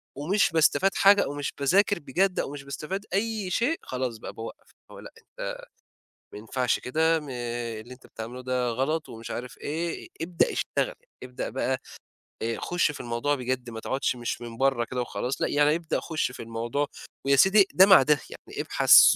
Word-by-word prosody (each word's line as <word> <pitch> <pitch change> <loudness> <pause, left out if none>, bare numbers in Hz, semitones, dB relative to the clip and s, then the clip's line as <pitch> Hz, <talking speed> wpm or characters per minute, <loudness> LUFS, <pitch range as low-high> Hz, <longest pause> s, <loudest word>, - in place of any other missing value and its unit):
ومش 180 +9 +2
باستفاد 165 +4 +3
حاجة 200 +1 +6
أو - - -4
مش 145 -1 -3
باذاكر 195 +9 +3
بجد 180 +7 0
أو - - -2
مش 145 -1 -7
باستفاد 155 +9 -5
أي 210 -1 -1
شيء، 265 - +1
خلاص 125 -3 -3
بقى - - -8
باوقّف 115 0 -9 0.2
اللي - - -13
هو - - -10
لأ - - -11
أنت - - -7 0.7
ما - - -7
ينفعش 125 +4 0
كده 160 +5 +2
م 150 - -10
اللي 120 -1 -5
أنت 125 - -16
بتعمله 120 +3 -7
ده 125 -1 0
غلط 145 +7 -1
ومش 115 0 -8
عارف 125 +1 -6
إيه، 165 +3 -4
ابدأ 170 +1 +1
اشتغل، - - -1 0.3
أبدأ 125 0 -5
بقى 130 0 -1 0.6
آآ 115 0 -1
خُش 175 -3 +1
في 150 - -9
الموضوع 120 +5 -1
بجد 125 -1 -3
ما 115 - -6
تقعُدش 130 +2 -1
مش 120 0 -4
من 115 -1 -8
برّه 135 -2 +2
كده 125 +1 -3
وخلاص، 125 +1 -3
لأ - - +2
يعني 145 +1 +3
ابدأ 165 -1 -2
خُش 155 -5 -2
في - - -9
الموضوع 115 +5 -2 0.4
ويا 140 0 +5
سيدي 190 +7 +6
ده 190 - +8
مع 190 -6 +8
ده، 150 +1 +3
يعني - - -7
ابحث - - +7
135 Hz, 190 wpm, -27 LUFS, 125-165 Hz, 0.7 s, ده